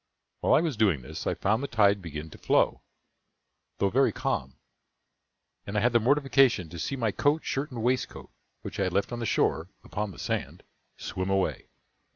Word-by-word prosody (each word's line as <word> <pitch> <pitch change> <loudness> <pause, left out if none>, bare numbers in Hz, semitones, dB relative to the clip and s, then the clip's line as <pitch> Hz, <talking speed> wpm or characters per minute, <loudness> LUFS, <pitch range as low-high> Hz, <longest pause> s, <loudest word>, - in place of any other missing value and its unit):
While - - +4
I - - +5
was 160 -8 -2
doing 95 - +2
this, 65 - -6
I - - 0
found 110 +5 +1
the 140 - -2
tide 100 -4 +3
begin 80 -2 -7
to - - -13
flow, - - +2 1.0
though 100 - +1
very 135 +3 +3
calm; 65 0 -3 1.1
and 100 +1 -2
I - - +2
had 120 +1 +2
the 120 - +5
mortification 135 - +3
to 85 - -8
see 135 - -2
my 115 -5 0
coat, 145 +8 +1
shirt, 140 +3 -2
and 120 -5 -5
waistcoat, 125 +1 -1 0.3
which - - -6
I 95 - +2
had 90 - -2
left 100 - 0
on 120 - -4
the 115 - -2
shore, 80 +3 +1
upon 105 0 -3
the 95 - -11
sand, - - -3 0.3
swim 95 +1 -4
away. 95 -1 0
105 Hz, 195 wpm, -28 LUFS, 95-130 Hz, 1.1 s, I